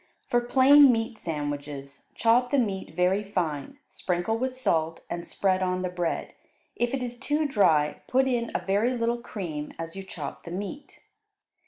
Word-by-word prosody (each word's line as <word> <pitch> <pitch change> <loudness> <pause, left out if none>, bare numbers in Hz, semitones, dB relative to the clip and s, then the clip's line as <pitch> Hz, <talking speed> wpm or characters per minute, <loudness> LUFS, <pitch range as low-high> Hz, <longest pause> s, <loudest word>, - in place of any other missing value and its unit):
For 240 - +2
plain 265 +3 +7
meat 225 -1 -2
sandwiches, 145 -3 -5
chop 240 +2 +3
the 280 - +2
meat 195 -9 -1
very 185 +4 +2
fine, 180 - -3
sprinkle 180 +4 -1
with 255 +2 -2
salt, 165 -9 0
and 170 0 -4
spread 190 -1 +1
on 185 0 0
the 180 - -2
bread; 175 -2 -2 0.4
if 240 +2 0
it 260 - -3
is 245 0 -5
too 295 +3 0
dry, 160 - +2
put 265 +1 +3
in 240 -2 0
a - - -2
very 210 +6 +2
little 235 +1 0
cream 170 -10 -5
as 165 +1 -6
you 195 - -5
chop 170 -6 -7
the - - -8
meat. 205 +11 -7
195 Hz, 170 wpm, -27 LUFS, 170-245 Hz, 0.4 s, plain